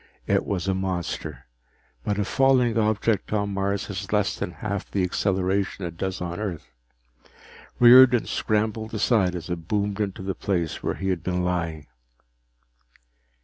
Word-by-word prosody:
It - - +1
was 95 -2 -2
a 95 - +2
monster, 85 -7 -4 0.6
but 105 - -1
a 105 - 0
falling 130 -3 +3
object 110 -1 +1
on 100 -1 0
Mars 100 0 -1
has 100 -1 -6
less 105 -1 +1
than - - -3
half 100 +4 -5
the 95 - 0
acceleration 95 +1 0
it 85 -1 -6
does 95 +1 -3
on 85 +1 -4
Earth. 85 - -5 1.1
Riordan 125 0 +8
scrambled 110 +1 -1
aside 105 -4 +2
as 85 - -6
it 85 -2 -5
boomed 105 +1 -1
onto 95 -2 -3
the 95 0 -2
place 90 -5 -2
where - - -2
he 95 - -3
had 90 -3 -1
been 90 0 -1
lying. 85 -4 -2
95 Hz, 150 wpm, -25 LUFS, 90-105 Hz, 1.1 s, Riordan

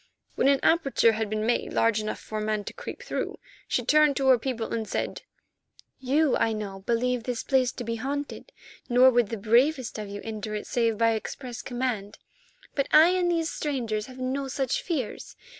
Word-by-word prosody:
When - - +1
an 275 -1 +4
aperture 275 -8 +4
had 220 -1 -2
been 215 0 -1
made 240 +1 0
large 225 -1 +2
enough 215 - -4
for 215 - -5
a - - -3
man 215 -1 -1
to - - -7
creep 485 0 -8
through, - - -3 0.3
she - - -1
turned 300 -2 +4
to 270 -1 +2
her 255 -2 +6
people 230 -2 -3
and 225 -2 -2
said: - - -3 0.8
"You, 275 +2 +2
I 225 -1 +1
know, 200 -3 -5
believe 235 +4 0
this 240 0 -3
place 260 -3 +2
to 245 - -6
be 230 0 -3
haunted, 285 - -5 0.4
nor 250 +2 +6
would 240 -4 +2
the 225 - -3
bravest 240 +4 +2
of 210 -1 -6
you 205 0 -6
enter 215 -1 -5
it 210 - -4
save 230 -3 0
by 230 +1 +3
express 240 +2 -5
command. 240 -5 -3 0.6
But 275 - 0
I 315 +3 +8
and 360 -1 +1
these 330 -2 0
strangers 230 -8 -2
have 255 -1 -12
no 260 +2 -2
such 265 -1 -1
fears. 280 - -4
245 Hz, 195 wpm, -27 LUFS, 220-275 Hz, 0.8 s, I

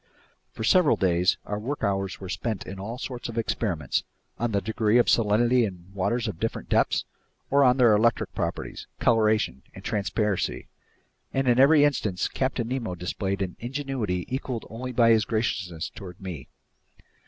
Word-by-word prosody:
For - - -6
several 175 +6 +5
days 90 -2 +2
our 105 0 -3
work 135 +7 -4
hours 95 -1 -1
were 95 - -7
spent 110 +2 -3
in 95 0 -7
all 110 +5 -5
sorts 125 -2 -5
of 115 - -7
experiments, 90 - -1 0.4
on 120 0 0
the 100 - +2
degree 110 +1 +1
of 120 - +5
salinity 120 +3 +3
in 90 -3 -5
waters 115 +5 0
of 95 -6 -5
different 115 - -3
depths, - - +2 0.5
or 140 +1 +5
on 125 -1 +5
their 120 -4 +6
electric 115 +3 +1
properties, - - -4
coloration, 110 - +2
and - - -10
transparency, 105 -1 -1 0.7
and 135 0 +1
in 120 0 +4
every 145 +2 +7
instance 105 -10 +1
Captain 130 -3 -2
Nemo 120 -8 -2
displayed 95 +3 -2
an 90 -2 -5
ingenuity 120 -8 -3
equaled 130 -2 -4
only 125 +3 -5
by 115 -1 +4
his 110 -2 +5
graciousness 100 -7 -2
toward 90 -2 -10
me. 90 -9 -7
110 Hz, 165 wpm, -26 LUFS, 95-120 Hz, 0.7 s, every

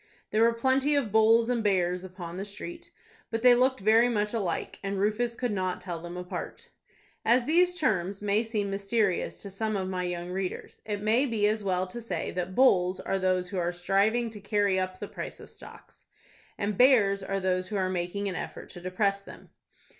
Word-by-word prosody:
There 215 - +2
were 230 +1 +6
plenty 265 +5 +2
of 260 -8 0
bulls 225 +1 +5
and 240 -2 0
bears 180 -3 +1
upon 180 -2 -8
the 195 - -3
street; 330 +12 -8 0.4
but 225 0 -3
they 250 -1 +8
looked 255 -1 +2
very 225 +4 +5
much 210 -2 -1
alike, 195 -7 -3
and 195 0 -3
Rufus 215 +4 0
could 245 -1 -2
not 185 -2 -1
tell 175 -3 -6
them 175 +1 -7
apart. 180 0 -7 0.5
As 240 +2 +3
these 355 +4 +3
terms 195 - 0
may 205 +1 +2
seem 215 -3 -2
mysterious 200 -1 0
to 200 - -8
some 215 +2 -2
of 190 -1 -2
my 185 -1 -2
young 175 0 -4
readers, 185 0 -5
it 205 -1 -3
may 230 +6 +3
be 215 -4 +1
as 215 0 0
well 185 -1 0
to 210 +6 -8
say 180 -8 -3
that 180 +1 -4
"bulls" 185 -8 +4
are 195 - -2
those 185 -1 0
who 195 - -3
are 175 0 0
striving 200 +6 +1
to 210 -2 -10
carry 205 -2 +1
up 185 0 -3
the - - -5
price - - -7
of - - -13
stocks, - - -14 0.5
and 200 -1 -2
"bears" 215 -7 +5
are 195 +1 -2
those 185 -1 0
who 210 - -5
are 190 -2 +1
making 185 +2 -2
an 190 - -2
effort - - -6
to 175 - -10
depress 195 +2 0
them. - - -14
200 Hz, 205 wpm, -28 LUFS, 185-225 Hz, 0.5 s, they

